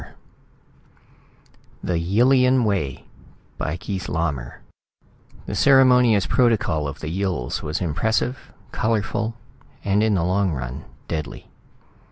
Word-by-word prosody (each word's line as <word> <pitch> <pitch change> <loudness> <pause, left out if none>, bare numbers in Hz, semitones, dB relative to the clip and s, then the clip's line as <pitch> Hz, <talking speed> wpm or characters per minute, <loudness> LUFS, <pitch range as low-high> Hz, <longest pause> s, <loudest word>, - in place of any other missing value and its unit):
net - - -12 1.7
THE 85 -2 0
YILLIAN 125 +8 +3
WAY 95 -11 -2 0.5
By 80 +2 -2
KEITH 95 -2 -5
LAUMER 70 -6 -3 0.8
The - - -5
ceremonious 125 -7 +5
protocol 85 - +1
of 70 +1 -7
the 75 - -5
Yills 90 -9 -2
was 75 +4 -3
impressive, 110 - -1 0.2
colorful 115 +1 -1 0.5
and, 100 +1 +2
in 110 -1 +2
the 85 - +1
long 95 0 +1
run, 65 +1 -6 0.2
deadly! 75 -3 -5
95 Hz, 110 wpm, -22 LUFS, 80-115 Hz, 1.7 s, ceremonious